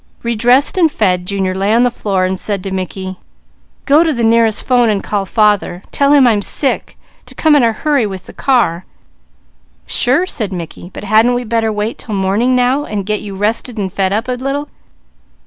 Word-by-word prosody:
Redressed 245 - +2
and 325 -3 +4
fed, 180 -6 0
Junior 190 -1 -1
lay 195 +2 0
on 240 - +4
the 245 - +2
floor 195 -5 -1
and 185 0 -2
said 200 -3 -3
to 195 - -5
Mickey: 190 0 -5 0.7
"Go 295 +3 +5
to 325 - +1
the 235 -5 -2
nearest 225 -1 +2
'phone 245 -3 +3
and 205 -2 -1
call 200 -2 -2
father. 205 -4 +1
Tell 280 0 +2
him 285 -3 +6
I'm 220 -4 +3
sick, 270 +6 -3 0.3
to - - -14
come 310 -2 +3
in 290 - +5
a 230 -1 +3
hurry 275 0 0
with 190 -2 -8
the - - -12
car." 230 -10 +1 1.0
"Sure!" 265 +9 +1
said 220 - -4
Mickey. 175 -1 -7
"But - - -9
hadn't 220 +4 +3
we 245 - -2
better 225 -1 0
wait 210 +2 -3
'til 215 - -5
morning 200 +7 +1
now, 250 +3 +2
and 205 -7 -4
get 210 +1 -2
you 200 -2 -7
rested 220 +4 -2
and 190 -3 -3
fed 190 -1 0
up 220 +5 -1
a - - -2
little?" 275 +4 -3
220 Hz, 200 wpm, -15 LUFS, 195-250 Hz, 1.0 s, him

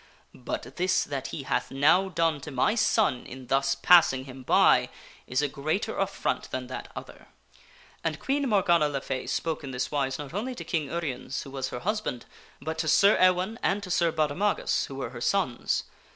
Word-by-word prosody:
But 125 0 -6
this 185 +1 +2
that 135 -2 -4
he 135 +1 -6
hath - - -1
now 160 +8 +3
done 165 -4 0
to 150 - -7
my 135 +9 +1
son 215 - +2
in 130 0 -9
thus 135 +1 +1
passing 135 -3 +5
him 130 -1 -10
by 125 - +4 0.4
is 130 +3 0
a - - +2
greater 155 +10 -2
affront 195 0 -2
than 130 0 -4
that 130 - -7
other." - - -10 0.8
And - - -1
Queen 275 0 0
Morgana 175 -7 +3
le 140 -1 -2
Fay 130 -1 -4
spake 160 -2 -2
in 140 - -6
this 125 -1 -3
wise 135 -3 -1
not 145 +1 -8
only 245 +6 -3
to - - -7
King 160 -5 -2
Uriens, 145 -4 -4
who 135 - -11
was 135 -1 -3
her 125 - -6
husband, 210 - -2 0.3
but 160 0 -5
to 160 - -1
Sir 200 +6 +5
Ewaine 185 +4 +3
and 200 +1 0
to 185 - -6
Sir 170 -2 +2
Baudemagus, 155 +6 0
who 135 - -8
were 135 -3 -4
her 120 - -8
sons. 130 -4 0
150 Hz, 195 wpm, -27 LUFS, 135-185 Hz, 0.8 s, passing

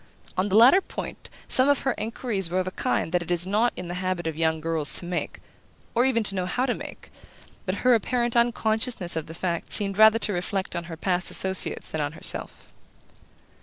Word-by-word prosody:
On 190 +2 -1
the 195 - 0
latter 260 - +7
point - - -8 0.2
some 260 +2 +4
of 285 - +2
her 265 - 0
enquiries 215 -4 -2
were 180 +2 -1
of 185 - -1
a 185 - -4
kind 160 - -2
that 180 -1 +1
it 170 - -8
is 175 0 +1
not 215 +5 +1
in 180 - -7
the 175 - -5
habit 185 -2 -2
of 160 -1 -3
young 160 0 0
girls 160 -2 0
to - - -3
make, 175 0 -4 0.5
or 240 +2 +2
even 235 -4 +2
to 200 - +5
know 185 -2 -2
how 250 +7 -1
to 250 - 0
make; - - -10 0.6
but 185 - -1
her 250 - +6
apparent 240 +1 0
unconsciousness 225 -5 +1
of 160 -2 -4
the 160 - -9
fact 170 -1 -4
seemed 200 -1 +1
rather 220 +1 +7
to 215 -2 0
reflect 185 +1 -3
on 170 0 -4
her 165 -1 -8
past 180 +1 -1
associates 190 0 +3
than 160 - -3
on 145 +1 -3
herself. - - -2
190 Hz, 215 wpm, -25 LUFS, 175-230 Hz, 0.6 s, latter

